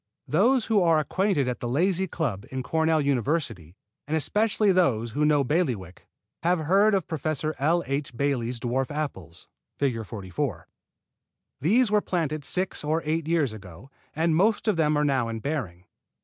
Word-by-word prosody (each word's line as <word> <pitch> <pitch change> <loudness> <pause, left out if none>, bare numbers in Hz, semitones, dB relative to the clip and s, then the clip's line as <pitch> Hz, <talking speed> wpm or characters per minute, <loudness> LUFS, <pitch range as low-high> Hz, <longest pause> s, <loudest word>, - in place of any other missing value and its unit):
Those 230 - +3
who 215 -3 +2
are 165 -2 +4
acquainted 155 -1 0
at 125 -1 -2
the 120 - -4
Lazy 180 +7 +1
Club 125 - -3
in 130 -1 -4
Cornell 160 +4 +1
University, 130 - -1 0.3
and 160 +2 0
especially 210 +6 +2
those 120 -12 +1
who 150 +6 +1
know 150 -2 +3
Bailiwick, 125 - -2 0.3
have 175 +2 +2
heard 200 +6 +4
of 190 - -1
Professor 155 -1 -2
L. 165 +5 +2
H. 140 -3 -3
Bailey's 125 -4 -1
dwarf 125 +3 -1
apples. 95 - -6 0.3
(Fig. 125 -5 -1
44.) 105 +5 -4 0.9
These 215 - +3
were 210 -1 +4
planted 155 -6 -2
six 185 +4 -1
or 155 +2 0
eight 160 0 -1
years 160 -8 +1
ago, 100 +4 -12 0.2
and 160 +1 +1
most 210 +5 +2
of 215 - +3
them 155 -2 +2
are 150 - +2
now 130 -4 +1
in 115 -1 -4
bearing. 110 - -4
150 Hz, 165 wpm, -26 LUFS, 125-170 Hz, 0.9 s, are